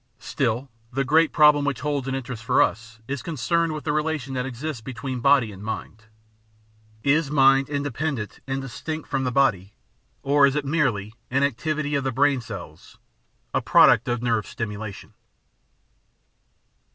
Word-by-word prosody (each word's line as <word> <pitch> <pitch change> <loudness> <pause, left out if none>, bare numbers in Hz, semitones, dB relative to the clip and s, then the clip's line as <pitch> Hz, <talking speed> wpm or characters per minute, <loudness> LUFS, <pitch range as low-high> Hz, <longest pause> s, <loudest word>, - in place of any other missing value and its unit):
Still, 120 +4 -2 0.2
the 135 +2 0
great 160 +4 +3
problem 150 -2 +5
which 145 -2 -2
holds 145 -3 -2
an 135 - -1
interest 125 -4 -6
for - - +2
us 115 +1 0
is 140 -1 -3
concerned 165 0 0
with 155 -2 -6
the 150 - -1
relation 155 -4 -2
that 125 0 -2
exists 135 +1 -5
between 130 +1 -5
mind 135 -4 +4
and 100 0 -11
body. 110 +1 -4 1.1
Is 145 +1 +2
mind 135 -1 +4
in 140 -1 -2
dependent 140 -5 -3
and 135 0 -2
distinct 155 +4 -6
from 135 -1 -1
the 125 - 0
body, 105 -8 +1 0.5
or 140 0 +5
is 140 - -1
it 150 -1 -1
merely 130 -9 0 0.2
"an 135 +2 +1
activity 150 +2 -1
of 140 -1 0
the 135 - -1
brain 140 +1 +2
cells, 115 - -10 0.6
a - - +1
product 120 +6 +5
of 120 -1 -1
nerve 115 -3 0
stimulation"? 105 -2 -6
135 Hz, 160 wpm, -24 LUFS, 120-145 Hz, 1.1 s, problem